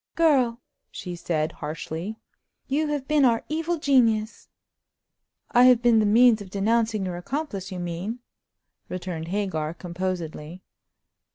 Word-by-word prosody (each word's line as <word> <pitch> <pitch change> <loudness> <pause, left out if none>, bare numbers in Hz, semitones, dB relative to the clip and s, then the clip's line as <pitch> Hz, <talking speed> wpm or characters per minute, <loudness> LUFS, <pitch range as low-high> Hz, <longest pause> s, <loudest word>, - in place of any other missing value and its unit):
"Girl!" 265 -8 +3 0.3
she 180 -2 -7
said, 160 -2 -1
harshly, 160 +7 -6 0.5
"you 300 +3 0
have 290 -3 -3
been 300 -2 +3
our 235 -3 +3
evil 325 +2 -1
genius!" 230 -7 +1 1.0
"I 245 +1 +6
have 250 -2 +5
been 235 -2 +5
the 215 - +3
means 230 +1 +5
of 195 - -9
denouncing 220 +1 +1
your 180 -1 -4
accomplice, 200 - -4
you 185 - -5
mean," 175 +6 -4 0.7
returned 175 -3 -5
Hagar, 170 -5 -2
composedly. 175 -2 -5
210 Hz, 125 wpm, -25 LUFS, 175-245 Hz, 1.0 s, I